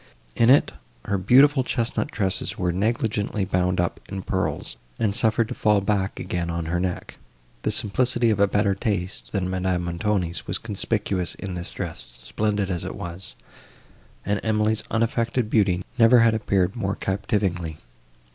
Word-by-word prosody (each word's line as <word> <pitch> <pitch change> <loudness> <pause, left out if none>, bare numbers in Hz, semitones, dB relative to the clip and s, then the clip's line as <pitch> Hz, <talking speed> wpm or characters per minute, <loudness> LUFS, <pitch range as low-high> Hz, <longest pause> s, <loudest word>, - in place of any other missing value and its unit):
In 115 - +4
it, 140 - +5 0.3
her 100 -1 0
beautiful 130 +8 +5
chestnut 125 +4 -1
tresses 100 -5 -2
were 90 -1 0
negligently 105 +1 0
bound 90 -1 0
up 90 -1 0
in 95 -1 -5
pearls, 95 -1 -2 0.2
and 105 -3 +1
suffered 110 +2 +2
to - - -3
fall 105 -1 +3
back 100 -1 -1
again 85 -1 -2
on 85 -1 -2
her 85 +2 -1
neck. 90 0 -3 0.4
The - - 0
simplicity 120 +2 +2
of 105 - 0
a 100 - +5
better 100 0 +2
taste, 100 -3 -3
than 95 -3 -1
Madame 95 -1 -1
Montoni's, 85 -1 -1
was 90 - 0
conspicuous 100 -4 -2
in 100 -3 -6
this 90 -1 -5
dress, - - -7
splendid 105 -2 -1
as 85 -2 -2
it - - -5
was, 85 +2 -6 0.9
and 105 0 0
Emily's 110 0 +1
unaffected 115 0 0
beauty 95 -5 +2
never 115 +1 +7
had 115 -1 +5
appeared 100 -3 +1
more 100 -4 -1
captivatingly. 95 -5 -1
100 Hz, 155 wpm, -24 LUFS, 90-110 Hz, 0.9 s, never